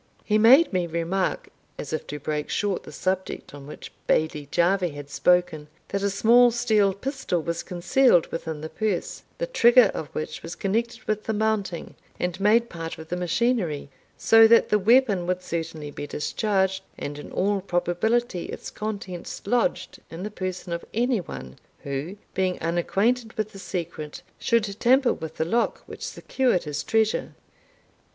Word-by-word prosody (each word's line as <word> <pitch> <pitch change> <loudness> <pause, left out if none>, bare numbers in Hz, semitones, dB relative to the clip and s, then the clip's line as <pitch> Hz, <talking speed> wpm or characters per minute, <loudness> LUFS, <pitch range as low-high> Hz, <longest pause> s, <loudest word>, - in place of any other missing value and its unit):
He 215 0 +3
made 255 +6 +7
me 180 -2 +1
remark, 170 +3 -1 0.3
as 145 - -6
if 155 - -3
to 150 - -5
break 150 +1 -3
short 205 -2 -1
the - - -10
subject 185 -4 -3
on 140 -1 -10
which 150 - -9 0.2
Bailie 155 -2 +1
Jarvie 175 -1 +1
had 145 0 -9
spoken, 175 -2 +2 0.2
that 200 - -2
a 200 - +1
small 235 +5 +5
steel 215 -5 +2
pistol 265 -5 -2
was 170 +1 -2
concealed 180 +3 +3
within 160 -2 -4
the 155 - -5
purse, 210 -3 -2 0.2
the - - -1
trigger 245 - +5
of 155 - -4
which 155 +3 -5
was 165 - -7
connected 230 +4 -2
with 215 0 -2
the 220 - -1
mounting, 210 -5 -1 0.3
and 180 +1 -2
made 220 +4 +4
part 165 -5 -6
of 160 0 -11
the 180 - -1
machinery, 180 - 0 0.3
so 225 0 +7
that 230 +1 +5
the 210 - +3
weapon 210 -4 +4
would 185 0 -1
certainly 160 -3 -4
be 145 - -6
discharged, 190 +4 0 0.2
and 145 +1 -5
in - - -10
all 200 +1 0
probability 180 +4 0
its - - -7
contents 200 -5 -6
lodged 245 +6 0
in 165 +3 -7
the 210 - -4
person 185 -3 -4
of 170 - -4
any 240 0 +2
one, 65 - -9 0.3
who, 140 +8 -4 0.2
being 185 -1 0
unacquainted 205 +8 0
with 215 0 -3
the 195 - -11
secret, 170 -5 -5 0.2
should 230 -2 +2 0.2
tamper 260 +1 +4
with 160 -1 -7
the 160 - 0
lock 230 +8 0
which - - -11
secured 255 -9 0
his 145 -1 -3
treasure. 220 -1 0
190 Hz, 165 wpm, -25 LUFS, 165-220 Hz, 0.3 s, made